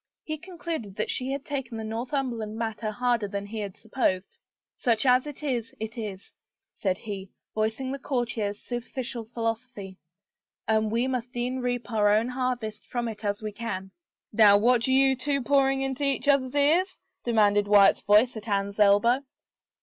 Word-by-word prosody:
He 310 Hz, -1 st, -4 dB
concluded 330 Hz, -, -6 dB
that 215 Hz, -, -1 dB
she 255 Hz, +1 st, -2 dB
had 275 Hz, 0 st, -4 dB
taken 270 Hz, -5 st, -4 dB
the 220 Hz, -, -4 dB
Northumberland 230 Hz, -1 st, -3 dB
matter 225 Hz, -1 st, -3 dB
harder 240 Hz, -1 st, 0 dB
than 200 Hz, 0 st, -4 dB
he 215 Hz, +2 st, -6 dB
had 200 Hz, -3 st, -5 dB
supposed. 205 Hz, -5 st, -1 dB, 0.2 s
'' -, -, -67 dB
Such 230 Hz, 0 st, +1 dB
as 255 Hz, +2 st, +4 dB
it 295 Hz, 0 st, -8 dB
is, 240 Hz, -6 st, -2 dB
it 220 Hz, 0 st, -4 dB
is/' 210 Hz, -4 st, -7 dB, 0.4 s
said 190 Hz, -2 st, -1 dB
he, 200 Hz, -3 st, -7 dB, 0.2 s
voicing 220 Hz, +5 st, -1 dB
the 275 Hz, -, -4 dB
courtier's 235 Hz, -6 st, -2 dB
superficial 240 Hz, -1 st, -5 dB
philosophy, 225 Hz, -4 st, -4 dB, 0.3 s
" -, -, -62 dB
and 220 Hz, 0 st, +2 dB
we 235 Hz, +2 st, +1 dB
must 250 Hz, -2 st, -3 dB
e'en 250 Hz, +2 st, -1 dB
reap 245 Hz, -3 st, -2 dB
our 210 Hz, -2 st, +3 dB
own 220 Hz, +3 st, +3 dB
harvest 250 Hz, -4 st, -3 dB
from 240 Hz, -1 st, -2 dB
it 220 Hz, -1 st, -7 dB
as 205 Hz, +1 st, -2 dB
we 215 Hz, -, -3 dB
can." 195 Hz, -3 st, -5 dB, 0.2 s
" -, -, -51 dB
Now 205 Hz, -2 st, +7 dB
what 240 Hz, +3 st, +4 dB
do 260 Hz, -, 0 dB
you 265 Hz, 0 st, +5 dB
two 280 Hz, +2 st, -1 dB
pouring 270 Hz, 0 st, +2 dB
into 270 Hz, +1 st, -2 dB
each 275 Hz, 0 st, 0 dB
other's 275 Hz, -2 st, +3 dB
ears? 315 Hz, +7 st, +3 dB
" -, -, -56 dB
demanded 205 Hz, -3 st, +3 dB
Wyatt's 205 Hz, -1 st, +6 dB
voice 210 Hz, +5 st, +4 dB
at 220 Hz, 0 st, -8 dB
Anne's 200 Hz, 0 st, -1 dB
elbow. 210 Hz, +5 st, +5 dB
230 Hz, 180 wpm, -27 LUFS, 210-260 Hz, 0.4 s, Now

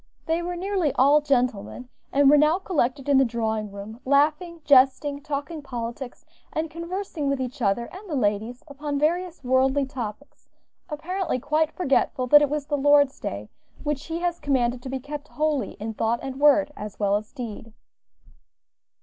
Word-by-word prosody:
They 330 Hz, +1 st, 0 dB
were 350 Hz, +1 st, -3 dB
nearly 370 Hz, -4 st, 0 dB
all 285 Hz, +4 st, +5 dB
gentlemen, 250 Hz, -4 st, -1 dB, 0.2 s
and 280 Hz, 0 st, +4 dB
were 290 Hz, -, +8 dB
now 305 Hz, +3 st, +4 dB
collected 290 Hz, -8 st, -1 dB
in 280 Hz, -2 st, +5 dB
the -, -, +6 dB
drawing 220 Hz, -3 st, -2 dB
room, 200 Hz, +3 st, -9 dB
laughing, 305 Hz, +5 st, +1 dB
jesting, 280 Hz, +1 st, +4 dB
talking 295 Hz, +2 st, -4 dB
politics, 245 Hz, -1 st, -6 dB, 0.3 s
and 315 Hz, 0 st, -3 dB
conversing 335 Hz, -3 st, -4 dB
with 275 Hz, -1 st, 0 dB
each 255 Hz, +1 st, -5 dB
other 210 Hz, +2 st, +1 dB
and 385 Hz, +2 st, -10 dB
the 305 Hz, -, -2 dB
ladies 220 Hz, +1 st, -1 dB
upon 290 Hz, 0 st, -4 dB
various 345 Hz, +2 st, -1 dB
worldly 265 Hz, +2 st, +2 dB
topics, 260 Hz, 0 st, -8 dB, 0.4 s
apparently 340 Hz, +1 st, -2 dB
quite 305 Hz, +4 st, 0 dB
forgetful 275 Hz, -5 st, 0 dB
that 295 Hz, +2 st, +8 dB
it 295 Hz, -, +2 dB
was 295 Hz, -1 st, -2 dB
the 290 Hz, 0 st, -1 dB
Lord's 285 Hz, 0 st, +4 dB
day, 100 Hz, +1 st, -5 dB, 0.4 s
which 295 Hz, -2 st, -2 dB
He 330 Hz, +1 st, -4 dB
has 345 Hz, -1 st, -1 dB
commanded 245 Hz, -3 st, 0 dB
to 260 Hz, -, -7 dB
be 265 Hz, -, -2 dB
kept 290 Hz, +2 st, -7 dB
holy 305 Hz, -3 st, -1 dB
in 220 Hz, +2 st, -6 dB
thought 225 Hz, +2 st, 0 dB
and 270 Hz, 0 st, -5 dB
word, 295 Hz, 0 st, +5 dB
as 210 Hz, -1 st, -8 dB
well 200 Hz, -1 st, +2 dB
as 210 Hz, +1 st, -4 dB
deed. 230 Hz, -4 st, -7 dB
280 Hz, 170 wpm, -25 LUFS, 245-305 Hz, 0.4 s, were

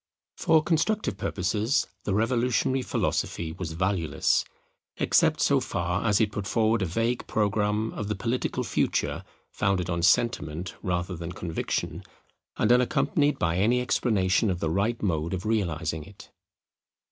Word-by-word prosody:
For 160 Hz, -1 st, +3 dB
constructive 190 Hz, +7 st, 0 dB
purposes 105 Hz, +7 st, 0 dB, 0.2 s
the 100 Hz, -, 0 dB
revolutionary 125 Hz, +3 st, +1 dB
philosophy 85 Hz, -8 st, -1 dB
was 80 Hz, -1 st, -5 dB
valueless; 85 Hz, -3 st, +1 dB, 0.5 s
except -, -, +3 dB
so -, -, +4 dB
far -, -, -2 dB
as 105 Hz, -1 st, +3 dB
it 105 Hz, -2 st, +2 dB
put 100 Hz, -1 st, -4 dB
forward 110 Hz, 0 st, +2 dB
a 95 Hz, -, 0 dB
vague 115 Hz, +8 st, -1 dB
programme 105 Hz, +1 st, 0 dB
of 105 Hz, -, -4 dB
the 105 Hz, -, -1 dB
political 115 Hz, +5 st, -2 dB
future -, -, -1 dB, 0.3 s
founded 95 Hz, -2 st, 0 dB
on 85 Hz, 0 st, -1 dB
sentiment 90 Hz, -4 st, +1 dB
rather 90 Hz, 0 st, -2 dB
than 85 Hz, +1 st, -6 dB
conviction, 80 Hz, -2 st, -3 dB, 0.6 s
and 110 Hz, -, +2 dB
unaccompanied 140 Hz, +4 st, +2 dB
by 85 Hz, 0 st, 0 dB
any 115 Hz, +6 st, +3 dB
explanation 105 Hz, -4 st, +1 dB
of 90 Hz, -2 st, -1 dB
the 80 Hz, -2 st, -1 dB
right 105 Hz, +6 st, 0 dB
mode 85 Hz, -2 st, 0 dB
of 90 Hz, -, -6 dB
realizing 80 Hz, -8 st, -1 dB
it. 100 Hz, +5 st, -15 dB
100 Hz, 140 wpm, -27 LUFS, 90-115 Hz, 0.6 s, so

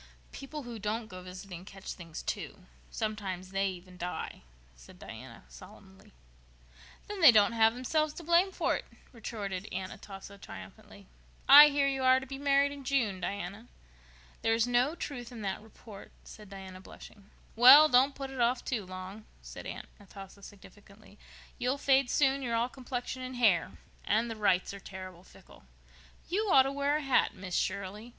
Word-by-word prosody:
"People 290 Hz, +2 st, -8 dB
who 240 Hz, -2 st, -8 dB
don't 215 Hz, +3 st, -3 dB
go 185 Hz, -3 st, -10 dB
visiting 180 Hz, -1 st, -9 dB
catch 195 Hz, 0 st, -9 dB
things, 165 Hz, -3 st, -9 dB
too. -, -, -5 dB, 0.2 s
Sometimes 195 Hz, -4 st, -4 dB
they 195 Hz, 0 st, 0 dB
even 180 Hz, -1 st, -8 dB
die," 180 Hz, +1 st, -5 dB, 0.3 s
said -, -, -16 dB
Diana -, -, -11 dB
solemnly. -, -, -16 dB, 1.0 s
"Then 410 Hz, -2 st, -6 dB
they 320 Hz, -, +10 dB
don't 210 Hz, -1 st, +4 dB
have 225 Hz, 0 st, +3 dB
themselves 305 Hz, +5 st, 0 dB
to 340 Hz, -, -8 dB
blame 345 Hz, +4 st, +3 dB
for -, -, 0 dB
it," -, -, -6 dB, 0.3 s
retorted 205 Hz, -5 st, -6 dB
Aunt 185 Hz, 0 st, -4 dB
Atossa 200 Hz, 0 st, -11 dB
triumphantly. 200 Hz, 0 st, -12 dB, 0.4 s
"I 290 Hz, +2 st, +11 dB
hear 285 Hz, -1 st, +1 dB
you 270 Hz, -1 st, -1 dB
are 260 Hz, 0 st, +5 dB
to 265 Hz, -, -9 dB
be 270 Hz, +1 st, -8 dB
married 280 Hz, 0 st, +3 dB
in 285 Hz, -1 st, -9 dB
June, 235 Hz, -8 st, 0 dB
Diana." 200 Hz, +4 st, -5 dB, 0.7 s
"There 225 Hz, 0 st, +2 dB
is 225 Hz, 0 st, +2 dB
no 245 Hz, +5 st, +1 dB
truth 255 Hz, -8 st, -6 dB
in 230 Hz, -3 st, -8 dB
that 195 Hz, 0 st, -3 dB
report," 215 Hz, -1 st, -14 dB
said 210 Hz, -2 st, -13 dB
Diana, 190 Hz, -2 st, -10 dB
blushing. 200 Hz, +1 st, -14 dB, 0.3 s
"Well, 265 Hz, +6 st, +9 dB
don't 265 Hz, +1 st, +4 dB
put 270 Hz, -1 st, -6 dB
it 260 Hz, -2 st, -4 dB
off 240 Hz, +1 st, +1 dB
too 235 Hz, -5 st, -2 dB
long," 185 Hz, +3 st, -9 dB, 0.2 s
said -, -, -9 dB
Aunt -, -, -7 dB
Atossa 195 Hz, 0 st, -13 dB
significantly. 205 Hz, +1 st, -16 dB, 0.4 s
"You'll 255 Hz, +3 st, 0 dB
fade 270 Hz, -2 st, +3 dB
soon—you're 270 Hz, -4 st, +1 dB
all 235 Hz, +2 st, 0 dB
complexion 255 Hz, 0 st, -6 dB
and 255 Hz, 0 st, -6 dB
hair. 210 Hz, -9 st, +2 dB, 0.3 s
And 225 Hz, +3 st, 0 dB
the -, -, -5 dB
Wrights 200 Hz, -3 st, +1 dB
are 200 Hz, -, -8 dB
terrible 185 Hz, -2 st, -10 dB
fickle. -, -, -18 dB, 0.7 s
You 410 Hz, +4 st, -1 dB
ought 265 Hz, -, +7 dB
to 270 Hz, -, -2 dB
wear 280 Hz, +1 st, 0 dB
a -, -, -4 dB
hat, 270 Hz, -4 st, +2 dB
Miss 185 Hz, -2 st, -8 dB
Shirley. 200 Hz, +4 st, -3 dB
225 Hz, 170 wpm, -30 LUFS, 195-265 Hz, 1.0 s, I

